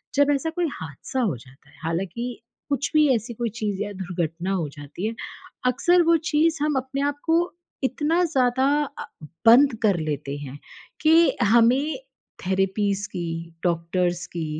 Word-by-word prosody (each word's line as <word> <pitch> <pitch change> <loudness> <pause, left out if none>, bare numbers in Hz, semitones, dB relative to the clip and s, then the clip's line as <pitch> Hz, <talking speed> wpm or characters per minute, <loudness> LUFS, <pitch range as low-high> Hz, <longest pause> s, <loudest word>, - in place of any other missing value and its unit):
जब 285 +1 +4
ऐसा 300 +4 -2
कोई 335 +1 -1
हादसा 160 - -5
हो 190 - 0
जाता 135 +3 -19
है। 140 - -21
हालाँकि 195 +10 -3 0.3
कुछ 280 -1 -1
भी 305 -1 +5
ऐसी 230 +2 -4
कोई 235 +1 -2
चीज़ 205 -2 -1
या 205 - -5
दुर्घटना 180 -1 -3
हो 175 -6 0
जाती 145 +6 -7
है। 225 - -3 0.5
अक्सर 350 +8 +4
वो 335 0 +4 0.2
चीज़ 320 +2 +3
हम 300 -1 +1
अपने 265 +2 -3
आप 290 0 -3
को 330 +1 +3 0.4
इतना 295 +6 +1
अ, - - +4
ज़्यादा 260 -4 +2 0.8
बंद 255 +3 +7
कर 200 -5 +4
लेते 145 -2 -3
हैं 145 -1 -8 0.4
कि 325 +2 +5
हमें 240 +7 +4 0.5
थेरेपीज़ 195 +2 0
की, 165 -2 -5
डॉक्टर्स 175 0 0
की 165 -2 -4
210 Hz, 155 wpm, -24 LUFS, 170-280 Hz, 0.8 s, बंद